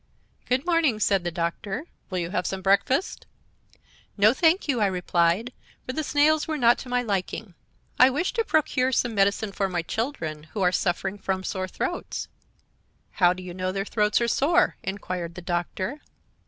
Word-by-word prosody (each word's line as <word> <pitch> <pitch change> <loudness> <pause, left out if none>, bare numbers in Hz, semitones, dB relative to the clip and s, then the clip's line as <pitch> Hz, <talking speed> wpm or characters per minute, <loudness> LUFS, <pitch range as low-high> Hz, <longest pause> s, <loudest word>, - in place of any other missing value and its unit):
"'Good 260 +4 +1
morning,' 330 -10 +2
said 195 -3 +2
the 175 - -1
Doctor; 175 - -3 0.2
'will 185 - -3
you 170 -1 -2
have 185 - -1
some 190 -1 -4
breakfast?' 230 - +1 0.9
"'No, 210 +3 +6
thank 330 +6 +3
you,' 255 -6 +1
I 205 - +4
replied, 180 +4 +1 0.3
for 255 - -4
the 315 - -1
snails 300 +1 +3
were 310 -1 -1
not 240 -3 +4
to 255 - -8
my 250 0 +1
liking; 200 -1 -3 0.5
'I 255 - +8
wish 300 +8 -1
to 455 - +1
procure 275 -8 +1
some 240 -1 +1
medicine 200 +1 +1
for 195 0 -1
my 175 -2 -2
children, 165 - -3
who 210 - -3
are 180 - +4
suffering 190 +3 -1
from 190 -1 -2
sore 190 -1 -3
throats.' 350 - -4 0.4
"' - - -42
How 175 -1 +7
do 185 0 -9
you 180 -1 -7
know 185 +1 -2
their 195 +1 -2
throats 210 0 +1
are 235 - +2
sore?' 330 +9 +3
inquired 180 -3 -4
the 180 - -7
Doctor. 185 - -3
205 Hz, 180 wpm, -25 LUFS, 185-260 Hz, 0.9 s, I